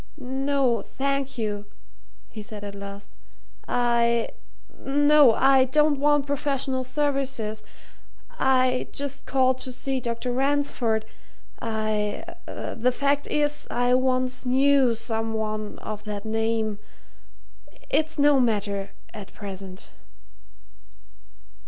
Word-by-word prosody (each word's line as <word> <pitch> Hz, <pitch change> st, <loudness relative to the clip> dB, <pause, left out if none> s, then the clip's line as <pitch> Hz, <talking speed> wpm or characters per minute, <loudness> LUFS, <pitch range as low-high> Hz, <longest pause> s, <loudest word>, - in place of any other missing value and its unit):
"No, 265 Hz, -2 st, 0 dB
thank 275 Hz, -1 st, -2 dB
you," 210 Hz, -2 st, -3 dB, 0.6 s
he 220 Hz, -, -8 dB
said 210 Hz, 0 st, -8 dB
at 200 Hz, -1 st, -6 dB
last. 200 Hz, 0 st, -9 dB, 0.6 s
"I 235 Hz, -1 st, +2 dB, 0.5 s
no, 290 Hz, -2 st, +5 dB
I 270 Hz, -1 st, +5 dB
don't 295 Hz, +2 st, +3 dB
want 295 Hz, 0 st, +3 dB
professional 275 Hz, -2 st, -1 dB
services 260 Hz, -6 st, -1 dB, 0.8 s
I 255 Hz, -1 st, +2 dB
just 280 Hz, -1 st, -3 dB
called 260 Hz, -1 st, +2 dB
to 255 Hz, -, -2 dB
see 265 Hz, +1 st, -2 dB
Dr. 235 Hz, +1 st, -3 dB
Ransford 260 Hz, -4 st, +1 dB, 0.6 s
I 215 Hz, -2 st, -1 dB, 0.2 s
the 245 Hz, +2 st, -1 dB
fact 280 Hz, +2 st, 0 dB
is, 295 Hz, 0 st, 0 dB
I 245 Hz, +1 st, +1 dB
once 255 Hz, 0 st, +1 dB
knew 265 Hz, -1 st, +4 dB
some 225 Hz, 0 st, -2 dB
one 215 Hz, -1 st, -3 dB
of 215 Hz, 0 st, -7 dB
that 205 Hz, 0 st, -5 dB
name. 220 Hz, -1 st, -1 dB, 1.1 s
It's 315 Hz, 0 st, +1 dB
no 290 Hz, -1 st, +5 dB
matter 205 Hz, -4 st, 0 dB, 0.2 s
at 210 Hz, -3 st, -9 dB
present." 195 Hz, -2 st, -8 dB
250 Hz, 105 wpm, -25 LUFS, 220-275 Hz, 1.1 s, no